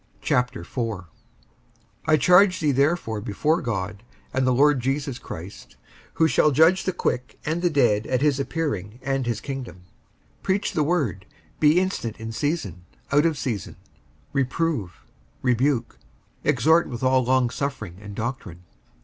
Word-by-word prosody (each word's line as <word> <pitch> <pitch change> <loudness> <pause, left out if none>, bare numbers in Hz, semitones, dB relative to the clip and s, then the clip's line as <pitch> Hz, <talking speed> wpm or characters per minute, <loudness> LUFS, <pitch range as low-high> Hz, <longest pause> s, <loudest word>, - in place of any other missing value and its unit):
55:004:001 115 -3 -1 1.0
I 155 -1 +5
charge 180 +3 +5
thee 150 -3 +2
therefore 140 -6 +1
before 150 - 0
God, 105 -3 -3 0.3
and 130 0 +1
the - - +4
Lord 140 +2 +4
Jesus 135 +1 -2
Christ, 80 - -9 0.4
who 160 - +4
shall 150 - +4
judge 160 +6 +4
the 185 - +1
quick 125 -7 -2
and 160 +3 -1
the 175 - +3
dead 120 -8 +2
at 130 +1 0
his 145 -2 +2
appearing 140 - -3
and 135 -2 -1
his 115 -2 -1
kingdom; 130 -10 -7 0.6
55:004:002 - - -37
Preach 195 +2 0
the 155 - +2
word; 140 - -1 0.3
be 155 +3 +5
instant 185 - -2
in 110 0 -5
season, 115 - -2 0.3
out 145 +3 +4
of 160 -3 -1
season; 110 -8 -4 0.6
reprove, 130 - -1 0.4
rebuke, 125 0 +1 0.4
exhort 160 +2 +3
with 120 -1 -6
all 130 0 +3
longsuffering 125 -5 -1
and 100 -1 -9
doctrine. 110 -7 -5
130 Hz, 140 wpm, -24 LUFS, 110-150 Hz, 1.0 s, I